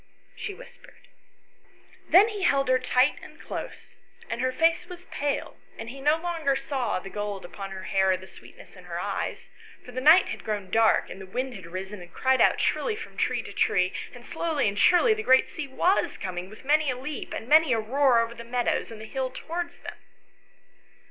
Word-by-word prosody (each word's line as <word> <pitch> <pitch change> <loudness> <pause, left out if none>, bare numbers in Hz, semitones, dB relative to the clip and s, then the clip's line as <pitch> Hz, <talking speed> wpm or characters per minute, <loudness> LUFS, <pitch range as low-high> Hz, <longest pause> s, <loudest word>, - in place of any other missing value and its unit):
she - - -5
whispered. - - -15 1.0
Then 400 +6 +7
he 420 -2 -5
held 275 -7 +2
her 255 0 +4
tight 255 +2 +2
and - - -13
close, - - -7 0.4
and 230 +1 -2
her 255 0 +1
face 330 +4 +2
was 360 0 -10
pale, 285 0 -2 0.2
and 225 +1 -7
he 270 - -10
saw - - -10
no 300 +2 +4
longer 325 -5 -1
the 255 -9 -2
gold 205 -2 -4
upon 195 +2 -7
her 190 -1 -7
hair 190 +1 +2
or 185 - +3
the 185 - -12
sweetness - - -15
in - - -14
her - - -5
eyes, - - -4 0.3
for 250 - -10
the 255 +1 -4
night 315 +7 +7
had - - -6
grown 205 -4 -4
dark 225 +1 +3
and 195 - -8
the 190 - -9
wind 255 +6 -3
had 190 -6 -10
risen 190 +3 -6
and 175 -1 -12
cried 260 +5 +2
out - - +4
shrilly 450 - 0
from 440 - -9
tree - - 0
to - - -9
tree, 180 -1 +2 0.2
and 245 -1 -13
slowly 320 -6 -1
and 200 0 -2
surely 365 - +5
the 435 - -3
great 260 -10 +5
sea 300 - -6
was 350 +8 +1
coming 185 0 -5
with 215 +5 -14
many 300 +1 +3
a 250 - -1
leap 280 +3 -6
and 225 - -5
many 310 0 +6
a 230 - +3
roar 250 +2 +3
over 230 0 -3
the 235 - -9
meadows 245 +1 -1
and 225 -2 -9
over - - -7
the - - -17
hill 265 -1 -1
towards 340 +6 -5
them. - - -8
255 Hz, 215 wpm, -26 LUFS, 210-310 Hz, 1.0 s, Then